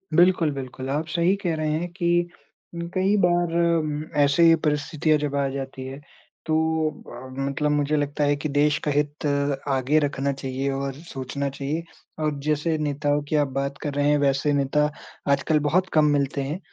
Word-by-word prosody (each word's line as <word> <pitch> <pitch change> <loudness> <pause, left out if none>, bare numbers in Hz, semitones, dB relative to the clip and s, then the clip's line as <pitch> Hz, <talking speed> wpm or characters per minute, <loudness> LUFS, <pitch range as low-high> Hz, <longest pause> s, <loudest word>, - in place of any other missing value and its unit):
बिल्कुल, 175 -3 +4
बिल्कुल। 130 -1 -6
आप 150 +3 -1
सही 175 +3 +2
कह 170 -2 0
रहे 155 -1 -1
हैं 175 - -3
कि 175 -1 +1 0.5
उम, 170 0 -4
कई 190 +2 +2
बार 175 -1 +1
अम, 155 -3 +1 0.2
ऐसे 140 +4 +3
ही 165 0 +7
परिस्थितियाँ 150 +1 +1
जब 145 -1 -2
आ 140 -1 +1
जाती 135 -1 -6
है, 135 +1 -7 0.5
तो 160 0 +1
अ, 130 -3 -11
मतलब 140 +2 0
मुझे 150 +1 +1
लगता 145 0 -1
है 145 0 +3
कि 150 +2 -4
देश 145 +1 +2
का 150 - +2
हित 145 +1 -1 0.4
आगे 135 +3 +2
रखना 140 -1 -1
चाहिए 135 0 -3
और 135 0 -3
सोचना 140 -2 -5
चाहिए। 140 +4 -3 0.4
और 150 -1 0
जैसे 155 +2 0
नेताओं 145 -1 0
की 155 - 0
आप 145 -2 +3
बात 140 +1 -3
कर 145 - -3
रहे 145 +1 +1
हैं, 150 - +4
वैसे 140 +1 +2
नेता 145 +2 +2 0.4
आजकल 150 +2 +2
बहुत 185 +3 +2
कम 155 -1 +5
मिलते 140 0 0
हैं, 150 +6 -4
150 Hz, 185 wpm, -24 LUFS, 140-160 Hz, 0.5 s, ही